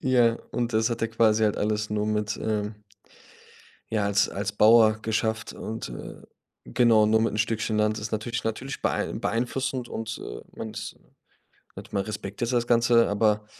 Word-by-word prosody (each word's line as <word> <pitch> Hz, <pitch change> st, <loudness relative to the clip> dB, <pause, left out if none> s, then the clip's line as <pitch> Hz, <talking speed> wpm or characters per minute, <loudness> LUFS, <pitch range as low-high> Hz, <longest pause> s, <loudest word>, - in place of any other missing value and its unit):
Ja, 120 Hz, -3 st, +3 dB, 0.2 s
und 120 Hz, 0 st, -1 dB
das 110 Hz, +2 st, +2 dB
hat 115 Hz, -, -3 dB
er 115 Hz, -, +1 dB
quasi 110 Hz, -1 st, +3 dB
halt 105 Hz, -, +1 dB
alles 105 Hz, 0 st, -1 dB
nur 105 Hz, 0 st, 0 dB
mit, 105 Hz, 0 st, -1 dB
ähm 105 Hz, -1 st, -2 dB, 1.2 s
ja, 105 Hz, -2 st, +1 dB
als 100 Hz, -1 st, +2 dB
als 100 Hz, +1 st, -3 dB
Bauer 110 Hz, +1 st, +6 dB
geschafft 110 Hz, 0 st, -1 dB
und, 110 Hz, -, -6 dB
äh -, -, -8 dB, 0.5 s
genau, 115 Hz, -3 st, +4 dB
nur 110 Hz, +1 st, +3 dB
mit 115 Hz, -, 0 dB
'n -, -, -3 dB
Stückchen 110 Hz, 0 st, 0 dB
Land. 105 Hz, 0 st, +1 dB
Das 105 Hz, -, -5 dB
ist -, -, -17 dB
natürlich 115 Hz, +2 st, -3 dB
natürlich 125 Hz, +5 st, -4 dB
beei -, -, 0 dB
beeinflussend 125 Hz, +2 st, -2 dB
und, 110 Hz, 0 st, -5 dB
äh, -, -, -7 dB, 0.2 s
man 110 Hz, -, -6 dB
ist, 105 Hz, -, -7 dB
ne -, -, -29 dB, 0.7 s
net -, -, -10 dB
man 100 Hz, -, +1 dB
respektiert 110 Hz, +3 st, -4 dB
das 120 Hz, -1 st, +1 dB
Ganze, 120 Hz, 0 st, +4 dB
aber, 105 Hz, 0 st, +1 dB
110 Hz, 180 wpm, -26 LUFS, 105-115 Hz, 1.2 s, Bauer